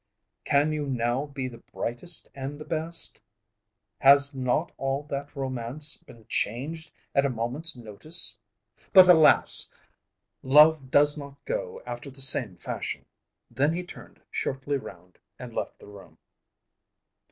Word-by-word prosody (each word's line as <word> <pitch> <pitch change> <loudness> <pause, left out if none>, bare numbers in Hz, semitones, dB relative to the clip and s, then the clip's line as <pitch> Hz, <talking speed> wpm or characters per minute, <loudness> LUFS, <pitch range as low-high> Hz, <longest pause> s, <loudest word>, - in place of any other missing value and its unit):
Can 145 +2 +2
you 150 -2 -3
now 125 +2 -1
be 140 -2 -5
the 120 -2 -11
brightest 120 +9 -3
and 135 +2 -6
the 150 - -10
best? 165 +1 +1 0.8
Has 140 +1 +6
not 130 +5 -1
all 135 +1 -2
that 140 +1 -5
romance 135 +2 -2
been 115 -2 -18
changed 145 +9 -3 0.2
at 140 - +3
a 140 - +1
moment's 125 +6 -2
notice? 115 - -3 0.6
But, 185 -1 +9
alas! 160 -4 +6 0.7
love 150 0 +5
does 145 +2 +4
not 140 -1 -10
go - - -5
after 140 - -7
the 135 0 -12
same 125 -7 +4
fashion." 90 - -6 0.5
Then 145 +4 +1
he 180 +1 -4
turned 180 - -14
shortly 135 +1 -3
round 90 -7 -13 0.2
and 125 -2 -10
left - - -5
the - - -16
room. 100 -1 -15
140 Hz, 135 wpm, -26 LUFS, 125-155 Hz, 0.8 s, But